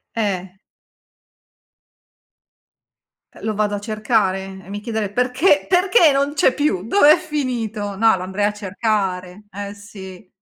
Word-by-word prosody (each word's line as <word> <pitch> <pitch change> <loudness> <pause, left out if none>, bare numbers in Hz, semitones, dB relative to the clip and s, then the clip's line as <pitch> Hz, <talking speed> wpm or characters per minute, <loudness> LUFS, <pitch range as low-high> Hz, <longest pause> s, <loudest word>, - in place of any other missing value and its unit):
Eh. 190 -4 -3 2.8
Uh - - -15
lo 220 - -1
vado 210 0 0
a 200 - -6
cercare, 205 -3 -1
e 185 - -17
mi 205 +1 -6
chiederei: 220 -2 -3
"Perché? 250 - +2
Perché 360 -3 +4
non 280 +2 0
c'è 275 - +3
più? 220 -11 -1
Dov'è 305 - +6
finito?" 230 - -4
No, 225 +1 +4
lo 180 - -6
andrei 190 +2 -2
a 210 - 0
cercare. 200 -2 -3
Eh 200 +1 -6
sì. 195 -2 -12
210 Hz, 135 wpm, -20 LUFS, 195-250 Hz, 2.8 s, Dov'è